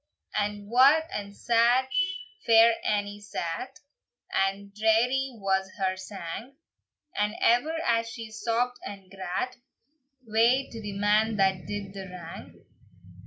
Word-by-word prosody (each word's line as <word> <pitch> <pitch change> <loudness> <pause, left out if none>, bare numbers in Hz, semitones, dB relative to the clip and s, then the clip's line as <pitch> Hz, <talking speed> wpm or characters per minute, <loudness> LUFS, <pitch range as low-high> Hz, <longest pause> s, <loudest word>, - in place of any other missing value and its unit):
And 205 -1 -2
wae 265 +7 +6
and 200 0 -5
sad 240 +2 +3 0.6
Fair 230 0 +7
Annie 205 0 -1
sat, 205 - -5 0.5
And 195 +1 0
drearie 240 +5 +2
was 190 -1 0
her 190 -1 0
sang, 190 - -7 0.6
And 210 +1 0
ever, 245 +8 +3
as 230 -1 +1
she 225 -1 -8
sobbd 235 +3 -1
and 195 -2 -9
grat, 195 +7 -3 0.7
"Wae 235 +5 +3
to 225 - -7
the 205 -1 -5
man 210 +2 +3
that 190 -4 +1
did 205 -1 -5
the 195 -1 -7
wrang!" 170 -2 -10
210 Hz, 120 wpm, -27 LUFS, 195-235 Hz, 0.7 s, Fair